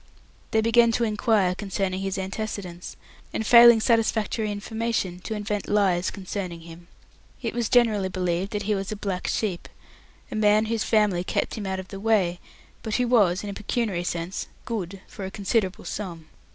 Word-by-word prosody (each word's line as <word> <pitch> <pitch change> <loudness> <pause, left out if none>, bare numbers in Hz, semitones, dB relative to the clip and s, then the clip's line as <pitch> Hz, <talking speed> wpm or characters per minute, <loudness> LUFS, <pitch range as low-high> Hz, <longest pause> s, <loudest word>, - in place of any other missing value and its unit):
They 220 - +2
began 230 +1 +5
to 235 - +1
inquire 210 -4 +2
concerning 190 -1 -2
his 195 -1 -2
antecedents, 190 -2 -5 0.4
and, 220 - -2
failing 235 0 +9
satisfactory 220 -1 +1
information, 205 -3 -2
to 220 +4 -5
invent 210 -1 -3
lies 190 -4 +2
concerning 185 -3 -5
him. 170 +1 -12 0.6
It 230 - -2
was 235 -1 -1
generally 215 -6 +3
believed 180 0 -1
that 205 0 -2
he 210 +1 0
was 195 +1 -3
a - - -2
black 195 -3 -3
sheep, 195 -6 -2 0.6
a - - -4
man 215 0 +4
whose 225 0 -1
family 210 -5 +2
kept - - -1
him 210 -4 -4
out 190 0 -2
of 185 -1 -8
the 195 - -7
way, 195 -5 +2 0.4
but 220 -2 -3
who 250 -1 +1
was, 205 -7 +3
in 205 - -4
a - - -6
pecuniary 205 -3 -2
sense, 175 +1 -3 0.2
"good" 195 -6 -4
for 200 - -9
a 190 - -3
considerable 195 -1 -1
sum. 170 -6 -5
205 Hz, 175 wpm, -25 LUFS, 185-220 Hz, 0.6 s, failing